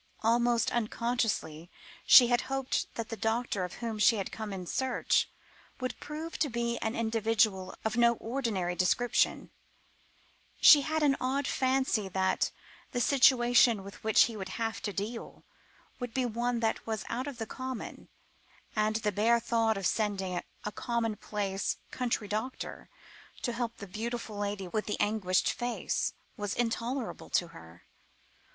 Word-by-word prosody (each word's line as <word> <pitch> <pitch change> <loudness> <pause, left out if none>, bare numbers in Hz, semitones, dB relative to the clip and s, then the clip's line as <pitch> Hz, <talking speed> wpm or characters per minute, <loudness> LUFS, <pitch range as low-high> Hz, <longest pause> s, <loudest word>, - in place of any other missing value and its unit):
Almost 235 0 +3
unconsciously 225 -8 -1 0.4
she 250 - +10
had 240 -1 +3
hoped 270 -1 -1
that 230 -1 -4
the 225 - -3
doctor 220 -2 -1
of 180 - -5
whom 230 -3 -4
she 225 - +5
had 195 -3 -3
come 220 -2 -5
in 185 -2 -5
search, 260 +7 +1 0.5
would 255 -1 -4
prove 315 +2 -6
to 300 - +2
be 235 0 -1
an 220 +1 -2
individual 220 -4 +1
of 220 0 0
no 235 0 +5
ordinary 225 -8 -2
description; 185 +7 +1 1.1
she 295 - +9
had 310 +2 -1
an 280 -2 +4
odd 270 +2 0
fancy 260 -7 +1
that 190 0 +1 0.4
the 245 - 0
situation 245 -4 +5
with 200 +1 -11
which 220 -1 +6
he 230 - -2
would 190 -2 -5
have 225 -1 -2
to 205 - -2
deal, 215 +4 -5 0.6
would 245 -3 -5
be 260 -1 +1
one 240 +1 -1
that 225 0 -1
was 220 -2 -3
out 255 +4 -3
of 280 -4 -6
the 225 - -3
common, 260 +2 -6 0.7
and 215 0 +1
the 215 -1 0
bare 225 +4 +3
thought 225 -1 +1
of 195 - -4
sending 195 -4 0 0.2
a 210 - -3
commonplace, 210 -4 -2
country 235 -4 -1
doctor 220 +5 -4 0.5
to 240 - -1
help 235 -1 -3
the 200 - -7
beautiful 225 +2 -5
lady 200 -2 -3
with 215 +4 -2
the 210 - -2
anguished 205 -4 +2
face, 240 -1 -2 0.2
was 205 -2 -3
intolerable 240 +1 -2
to 175 - +1
her. 85 - -14
225 Hz, 150 wpm, -30 LUFS, 205-245 Hz, 1.1 s, she